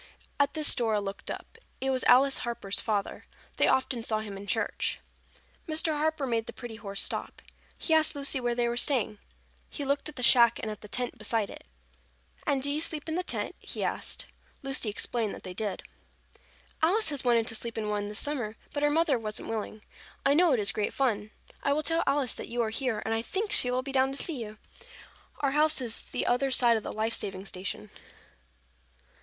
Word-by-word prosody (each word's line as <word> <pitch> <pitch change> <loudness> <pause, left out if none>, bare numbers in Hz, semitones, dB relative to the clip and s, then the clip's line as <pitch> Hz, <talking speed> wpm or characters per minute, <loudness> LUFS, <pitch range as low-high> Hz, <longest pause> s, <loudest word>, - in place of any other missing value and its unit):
At 285 +2 +2
this 305 -1 +4
Dora 225 -4 +2
looked 200 -1 -6
up. 450 - -7 0.2
It 265 0 0
was 260 -1 +1
Alice 270 +2 +6
Harper's 230 -5 -2
father. 205 -3 -2 0.3
They - - +4
often 260 -3 +2
saw 215 -1 +1
him 205 -2 -6
in 200 +1 -8
church. - - 0 0.7
Mr. 315 0 +2
Harper 310 -1 0
made 230 -3 -1
the - - -6
pretty 240 -3 -8
horse 200 -3 -2
stop. - - -3 0.4
He 325 - 0
asked 315 -1 +4
Lucy 280 -1 0
where 240 -1 0
they 240 0 +1
were 235 - -1
staying. 240 -6 +2 0.5
He 285 - -5
looked 280 +2 0
at 300 - -11
the 250 - -4
shack 235 -1 +6
and 220 - -3
at 210 - -8
the 210 - -9
tent 245 +4 -3
beside 215 -1 0
it. - - -12 0.8
"And 275 -3 +1
do 285 - +2
you 300 +2 0
sleep 310 -2 +1
in 320 - -2
the 355 - +1
tent?" 365 - -2
he - - -5
asked. - - -3 0.4
Lucy 270 -5 +1
explained 220 +1 -1
that - - -12
they 185 - -6
did. 200 -1 -3 1.0
"Alice 370 +5 +4
has 285 -3 -2
wanted 235 -2 +3
to - - -2
sleep 230 +1 -5
in 215 -1 -2
one 205 -1 -1
this 210 0 -5
summer, 245 -7 -2 0.2
but 290 - -2
her 295 - +4
mother 300 -4 +3
wasn't 215 -1 -4
willing. 215 -1 -4 0.4
I 280 - +5
know 340 +2 +5
it 245 - +2
is 200 -1 +4
great 210 0 -1
fun. 215 -6 0 0.3
I 280 - +2
will 305 +2 0
tell 330 +2 +2
Alice 275 -3 +2
that - - -7
you 240 0 0
are 220 - -2
here 250 -1 -1
and 225 - 0
I 225 - +1
think 400 - -3
she 255 -11 +4
will 250 +1 0
be 275 - -5
down 265 0 +3
to - - -6
see 290 -4 -2
you. 215 0 -9 0.8
Our 280 -2 +2
house 305 +1 +4
is 235 -3 -5
the - - -2
other 260 +3 +2
side 240 -3 +4
of 220 - 0
the - - -5
life 220 +1 -1
saving 195 -1 -2
station." 185 - -5
245 Hz, 215 wpm, -29 LUFS, 215-285 Hz, 1.0 s, Alice